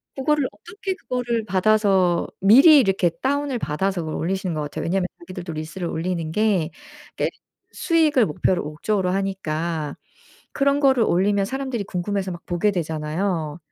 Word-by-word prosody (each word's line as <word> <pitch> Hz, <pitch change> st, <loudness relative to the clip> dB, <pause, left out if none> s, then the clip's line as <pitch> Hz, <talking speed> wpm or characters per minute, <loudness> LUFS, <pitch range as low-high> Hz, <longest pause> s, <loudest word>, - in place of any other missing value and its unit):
그거를 285 Hz, 0 st, +1 dB
어떻게 380 Hz, +2 st, -6 dB
그거를 240 Hz, -, -2 dB
받아서 195 Hz, -3 st, +2 dB
미리 275 Hz, -, +8 dB
이렇게 195 Hz, -7 st, +2 dB
다운을 280 Hz, -2 st, 0 dB
받아서 180 Hz, +5 st, -1 dB
그걸 155 Hz, -1 st, -4 dB
올리시는 185 Hz, +1 st, -2 dB
것 155 Hz, -, -2 dB
같아요. 145 Hz, -1 st, -5 dB
왜냐하면 180 Hz, +1 st, 0 dB
자기들도 175 Hz, -1 st, -7 dB
릴스를 155 Hz, +3 st, -5 dB
올리는 165 Hz, -1 st, -3 dB
게 195 Hz, -4 st, +1 dB, 0.4 s
그러니까 -, -, -2 dB, 0.4 s
수익을 315 Hz, -8 st, +2 dB
목표를 175 Hz, +2 st, 0 dB
목적으로 180 Hz, +6 st, -1 dB
하니까 170 Hz, -5 st, -2 dB, 0.6 s
그런 280 Hz, 0 st, +2 dB
거를 265 Hz, -5 st, +4 dB
올리면 200 Hz, +2 st, +2 dB
사람들이 260 Hz, -2 st, -3 dB
궁금해서 195 Hz, +1 st, -3 dB
막 175 Hz, -, -10 dB
보게 175 Hz, +4 st, +1 dB
되잖아요. 160 Hz, -1 st, -2 dB
195 Hz, 380 characters per minute, -22 LUFS, 170-235 Hz, 0.6 s, 미리